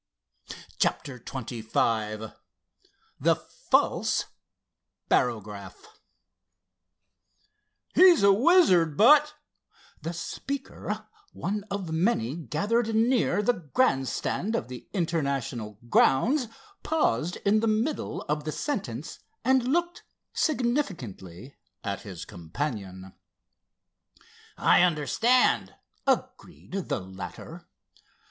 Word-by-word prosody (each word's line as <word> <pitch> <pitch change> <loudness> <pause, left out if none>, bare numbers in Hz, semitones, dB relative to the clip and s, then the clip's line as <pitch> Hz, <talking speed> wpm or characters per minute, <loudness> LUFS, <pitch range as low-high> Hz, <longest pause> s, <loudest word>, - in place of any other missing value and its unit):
CHAPTER 130 -3 -1
XXV 110 -3 -2 0.9
THE - - +3
FALSE - - 0 0.8
BAROGRAPH 105 -4 -1 2.1
"He's 360 - +7
a 200 0 +7
wizard, 195 - +4
but——" 295 +6 +6 0.7
The 165 - -4
speaker, 270 +10 -5 0.3
one 205 +3 -3
of 195 -5 -4
many 160 - +1
gathered 215 +8 -1
near 225 -4 +2
the 245 - +3
grand 155 - +1
stand 215 - -2
of 230 - -3
the 125 -1 -9
International 140 - -2
grounds, 240 - +3 0.3
paused 180 - 0
in 205 +2 +4
the 225 - 0
middle 225 +8 -1
of 150 0 -2
the 155 - -3
sentence, 290 - -4 0.3
and 260 -1 +3
looked 345 +5 0 0.3
significantly 165 - -2 0.3
at 100 -2 -3
his 90 -5 -8
companion. 95 - -6 1.4
"I - - +5
understand," 180 - +2 0.3
agreed - - -2 0.2
the - - -1
latter. 95 +1 -9
170 Hz, 85 wpm, -27 LUFS, -, 2.1 s, He's